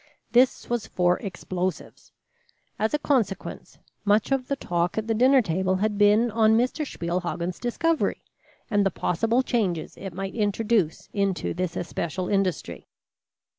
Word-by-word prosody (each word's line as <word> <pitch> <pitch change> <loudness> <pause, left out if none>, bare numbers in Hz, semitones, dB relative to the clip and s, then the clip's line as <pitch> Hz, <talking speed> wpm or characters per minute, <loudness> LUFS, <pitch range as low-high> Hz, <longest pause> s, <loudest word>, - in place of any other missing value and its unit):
This 250 +2 +3
was 240 -3 -2
for 180 0 +1
explosives. 185 -2 -5 0.7
As 220 +7 +1
a - - +2
consequence, 250 -10 -2 0.3
much 210 +4 +2
of 265 -2 0
the 280 - 0
talk 175 -7 -1
at 220 - -1
the 225 - 0
dinner 255 +3 +5
table 185 +1 0
had 205 +2 -1
been 210 +3 +4
on 220 0 +4
Mr. 255 +5 0
Spielhagen's 175 0 -3
discovery, 325 +7 0 0.4
and 205 -3 +2
the 195 - +3
possible 225 +8 0
changes 195 -11 -1
it 195 -1 -6
might 190 +3 -5
introduce 210 -4 0
into 200 -2 0
this 180 0 -3
especial 175 +1 -3
industry. 195 -3 -1
205 Hz, 140 wpm, -25 LUFS, 185-235 Hz, 0.7 s, dinner